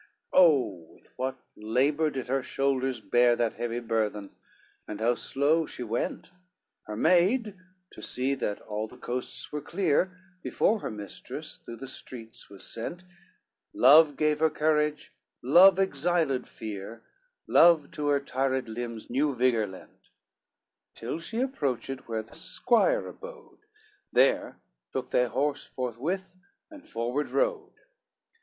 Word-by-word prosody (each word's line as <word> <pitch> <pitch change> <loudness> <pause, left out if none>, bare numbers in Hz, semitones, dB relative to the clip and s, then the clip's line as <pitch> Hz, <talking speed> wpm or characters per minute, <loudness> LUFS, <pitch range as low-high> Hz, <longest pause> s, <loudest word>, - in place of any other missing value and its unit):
XCIII - - +6
Oh, 125 - +2
with - - -23
what 130 +1 -3 0.2
labor 135 +9 +1
did 135 -3 -5
her 135 +2 0
shoulders 135 -2 -1
bear 120 +4 +3
That 120 -2 0
heavy 120 0 -3
burthen, 110 -3 -2 0.6
and 105 - -6
how 115 +2 +3
slow 145 +6 +1
she 125 - -5
went! 120 +9 -3 0.6
Her 105 - -5
maid, 195 - +3 0.4
to - - -12
see 130 +2 -1
that 105 -6 -2
all 105 0 -4
the - - -15
coasts 125 +1 -3
were 150 - -3
clear, 180 +2 0 0.2
Before 220 - +1
her - - -4
mistress, 105 -2 -7
through 115 - -8
the 135 +4 -9
streets 115 -3 -8
was 100 -1 -8
sent; 170 +10 -4 0.7
Love 145 +3 +7
gave 150 -1 +1
her 160 0 +4
courage, 150 0 0 0.3
love 180 +9 +7
exiled 165 -6 0
fear, 110 +1 -8 0.4
Love 165 -4 +5
to 150 -1 -3
her 145 -1 +3
tired 130 -2 -1
limbs 115 0 -6
new 140 +3 0
vigor 120 -3 +2
lent, 95 -1 -14 0.9
Till 120 +8 -4
she 225 +8 -3
approached 135 - -3
where 110 -1 -2
the - - -18
squire 240 - +1
abode, - - -12 0.5
There - - +2 0.4
took 130 -1 -4
they 125 - +3
horse 140 +4 -1
forthwith 155 - -4 0.3
and 300 -2 -13
forward 120 +6 -2
rode. 455 -5 -1
135 Hz, 135 wpm, -28 LUFS, 115-160 Hz, 0.9 s, Love